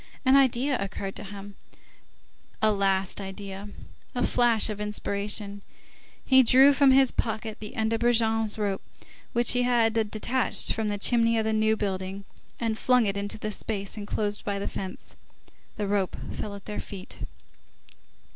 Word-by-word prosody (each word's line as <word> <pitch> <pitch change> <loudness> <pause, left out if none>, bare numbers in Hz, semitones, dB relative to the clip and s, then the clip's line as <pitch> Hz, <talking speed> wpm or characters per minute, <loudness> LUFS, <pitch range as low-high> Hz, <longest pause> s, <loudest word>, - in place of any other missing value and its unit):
An 260 +1 +5
idea 265 -1 +3
occurred 195 0 -5
to - - -5
him, 200 0 -9 1.1
a 215 - +3
last 195 -1 0
idea, 195 +1 -7 0.5
a 245 - +1
flash 235 -3 +3
of 210 -1 -4
inspiration; 205 0 -2 0.6
he 260 -1 +6
drew 265 +3 +6
from 280 -1 +4
his 265 -1 +6
pocket 220 -1 -3
the 215 +4 -9
end 220 -1 0
of 225 - 0
Brujon's 225 -2 +2
rope, 200 -2 -1 0.5
which 240 0 +4
he 250 - +2
had 240 -2 +2 0.2
detached 240 +4 +1
from 220 -1 -2
the 205 0 -2
chimney 230 +2 +2
of 220 - 0
the 220 - 0
New 220 0 +2
Building, 195 -1 -4 0.3
and 225 -2 -2
flung 250 -2 +3
it 200 -1 -1
into 200 +1 -3
the 215 0 -4
space 200 -2 -3
enclosed 205 0 -3
by 200 -1 -2
the 200 - -3
fence. 190 -1 -7 0.6
This 205 -2 -2
rope 195 -2 -1 0.2
fell 205 -1 -5
at 200 - -12
their 210 - -5
feet. 190 -2 -8
215 Hz, 160 wpm, -26 LUFS, 200-235 Hz, 1.1 s, he